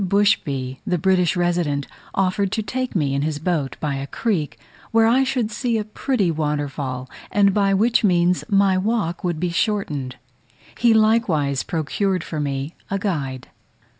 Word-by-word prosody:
Bushby, 160 -10 +1
the 180 - 0
British 180 +1 +2
resident, 170 -5 0 0.3
offered 190 +1 +1
to 220 - -1
take 255 +4 -3
me 145 -6 +1
in 140 - 0
his 150 0 -1
boat 150 -5 -2
by 150 -2 -1
a 135 +1 -5
creek, 180 -5 -2 0.3
where 225 0 +4
I 245 +4 +4
should 250 -4 -1
see 235 +1 -1
a 215 - -1
pretty 215 -2 0
waterfall, 145 -4 -3 0.2
and 200 -1 +4
by 195 -1 +2
which 230 +5 +3
means 180 -2 +3
my 195 -2 +3
walk 200 -4 -1
would 175 -3 -1
be 175 0 -1
shortened. 155 - -1 0.6
He 235 -1 +3
likewise 215 - +2
procured 180 +3 -1
for 155 - -5
me 140 +1 -3 0.2
a 195 - 0
guide. 140 - -3
180 Hz, 160 wpm, -22 LUFS, 145-205 Hz, 0.6 s, where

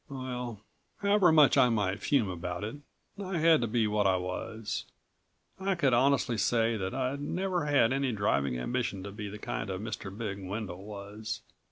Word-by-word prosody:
Well... 125 -4 -5 0.4
however 200 -3 +5
much 150 -3 +6
I 125 -2 +6
might 100 -4 0
fume 135 -8 +2
about 90 +1 -4
it... 110 +7 -4 0.5
I 185 -2 -2
had 160 -2 +5
to 120 - 0
be 115 0 +1
what 105 -1 +2
I 95 -1 +3
was. 90 +4 -4 0.7
I 190 0 0
could 140 -7 +2
honestly 125 -2 +3
say 115 0 +2
that 95 0 -3
I'd 135 +2 -1
never 180 +2 -1
had 135 -5 +4
any 135 -1 +1
driving 70 - +1
ambition 100 - -2
to 100 - -6
be 105 0 -6
the 105 - -7
kind 105 - -4
of 95 -1 -3
Mr. 105 -2 -5
Big 100 -1 -5
Wendel 95 -1 -5
was. 105 +1 -6
115 Hz, 180 wpm, -30 LUFS, 100-140 Hz, 0.7 s, much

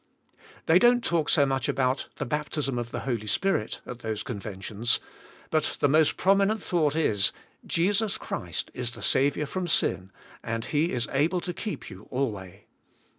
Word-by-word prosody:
They 165 +3 +6
don't 240 +3 +5
talk 165 -3 +1
so 145 -3 +5
much 135 -3 -1
about 130 0 0
the - - -3
baptism 150 -2 -2
of 120 -1 -4
the - - -4
Holy 115 -5 -2
Spirit 110 - 0
at 125 - -7
those 110 -3 -3
con 120 -5 -5
ventions, 105 +3 -1 0.5
but 155 -1 0
the - - +4
most 155 +2 +4
prominent 195 +2 +3
thought 155 -4 +1
is, 105 -11 +3 0.4
Jesus 200 +5 +1
Christ 85 -2 -4
is 120 -1 -3
the - - -8
Saviour 140 +3 +2
from 180 +5 -3
sin 95 - +1 0.3
and 115 +1 -3
He 155 +3 +1
is 125 -2 -1
able 155 +6 +2
to 180 -1 -4
keep 205 - -5
you 95 +2 -12
alway. 100 -8 -3
140 Hz, 170 wpm, -27 LUFS, 115-170 Hz, 0.5 s, They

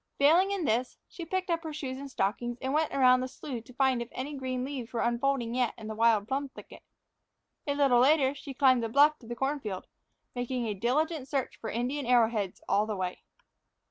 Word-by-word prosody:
Failing 330 +7 +5
in 395 -5 -1
this, 245 +1 0
she 340 - -8
picked 375 +1 -2
up 335 -1 0
her 320 - -5
shoes 270 -3 -5
and 280 0 -7
stockings 240 +2 -2
and 265 +1 -2
went 310 0 +1
around 255 -2 +5
the 255 - -2
slough 255 -2 -7
to 250 - -14
find 265 -2 +2
out - - -3
if - - -31
any 275 +4 -5
green 255 -2 -3
leaves 265 -4 -6
were 235 - -2
unfolding 240 0 0
yet 250 -2 0
in 220 - -10
the 220 - -4
wild 220 -2 +3
plum 275 +2 -2
thicket. - - -13 0.9
A 285 - 0
little 275 -4 +4
later 270 +1 +4
she 275 -1 -9
climbed 255 -2 +4
the 230 - -2
bluff 295 +5 +4
to 230 - -15
the 240 - -5
corn 275 +4 -1
field, 205 -7 -5 0.5
making 245 0 -2
a 215 - -1
diligent 270 - 0
search 275 -3 -2
for 220 - -6
Indian 250 +4 -2
arrowheads 225 -6 +2
all 205 +3 +2
the 215 - -2
way. 185 -1 -3
255 Hz, 220 wpm, -29 LUFS, 235-280 Hz, 0.9 s, Failing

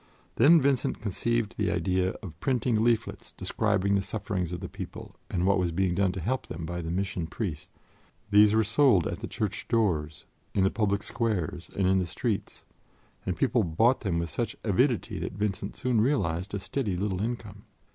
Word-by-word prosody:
Then 160 +7 +7
Vincent 135 -3 +1
conceived 110 +2 -1
the 105 - +2
idea 90 +2 +1
of 85 -5 -9
printing 120 -3 +1
leaflets 115 -1 0
describing 100 +2 0
the 100 - +3
sufferings 95 -4 -3
of 90 - -4
the - - -5
people - - -8
and 90 0 0
what 100 0 +3
was 90 -2 0
being 90 +1 +1
done 95 0 +2
to 95 - -4
help 130 +9 -2
them 80 +1 -5
by 85 +1 -4
the 80 - -5
Mission 90 -1 -2
Priests. 80 -4 -4 0.6
These 105 +1 +6
were 110 - +4
sold 110 - +4
at 85 - -3
the 115 - -5
church 105 -4 -3
doors, 80 -10 0 0.3
in 95 - +3
the 95 - +3
public 100 -2 0
squares 95 - -2
and 95 - +1
in 95 +1 +4
the 90 - -1
streets, 85 - -3 0.6
and - - -1
people - - +2
bought 115 +10 +2
them 95 -7 -1
with 85 -1 -2
such - - -2
avidity - - +1
that - - -4
Vincent 100 0 -2
soon 125 -4 +1
realized 100 - 0
a - - -2
steady 100 -2 -2
little 95 -1 -1
income. 105 -3 -5
100 Hz, 185 wpm, -28 LUFS, 90-110 Hz, 0.6 s, Then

